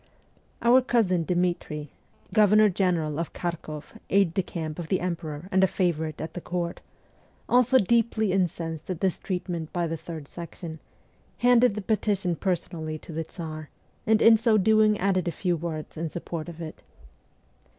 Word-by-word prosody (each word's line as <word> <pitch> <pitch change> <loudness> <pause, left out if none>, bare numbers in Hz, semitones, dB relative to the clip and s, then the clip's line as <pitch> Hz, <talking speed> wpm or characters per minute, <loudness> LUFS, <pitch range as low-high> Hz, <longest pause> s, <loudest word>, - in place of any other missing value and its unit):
Our 245 +2 +6
cousin 200 -9 +2
Dmitri, 175 -4 -1 0.4
Governor 215 0 +6
general 170 -5 0
of 165 - -3
Kharkoff, 165 -1 -5
aide 195 -4 +3
de 190 - +2
camp 160 -3 -5
of 170 - -5
the 190 - +1
Emperor 165 -2 -4
and 190 0 +4
a - - +6
favourite 160 -5 -1
at 160 - -5
the 180 - -6
court, 175 -1 -3 0.7
also 250 +1 +5
deeply 225 -1 +2
incensed 165 -4 -2
at 180 -3 -3
this 190 -1 0
treatment 175 -4 -4
by 175 -1 0
the 165 0 -3
Third 160 -2 -8
Section, 165 -1 -8 0.6
handed 245 -3 +4
the 210 - -3
petition 200 -4 0
personally 165 -3 -2
to 160 - -12
the 165 +1 -3
Tsar, 155 -3 -7 0.4
and 220 0 +4
in 225 0 +8
so 225 -1 +3
doing 215 +1 +4
added 185 -2 +1
a - - +1
few 175 +2 0
words 160 -1 -5
in 165 +1 -2
support 170 0 -5
of 170 0 -8
it. 155 - -8
175 Hz, 160 wpm, -26 LUFS, 160-200 Hz, 0.7 s, in